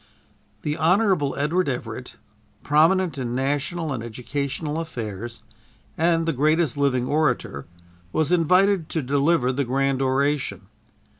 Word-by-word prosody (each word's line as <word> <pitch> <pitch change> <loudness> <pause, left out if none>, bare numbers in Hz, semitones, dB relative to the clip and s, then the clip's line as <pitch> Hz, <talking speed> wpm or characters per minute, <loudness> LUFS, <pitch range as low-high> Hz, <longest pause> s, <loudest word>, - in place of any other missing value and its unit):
The 150 +1 -2
Hon. 180 -3 +2
Edward 155 +4 +1
Everett, 120 -1 -5 0.5
prominent 160 +1 +3
in 120 -1 -3
national 145 +4 -1
and 120 - -4
educational 140 +6 -4
affairs, 115 - -6 0.5
and 165 0 +2
the 165 - 0
greatest 155 +2 +2
living 135 -3 +1
orator, 130 - 0 0.4
was 155 - 0
invited 180 +1 +3
to 160 - -2
deliver 140 0 +2
the 140 +2 -1
grand 135 +1 0
oration. 135 -6 0
145 Hz, 120 wpm, -23 LUFS, 130-165 Hz, 0.5 s, prominent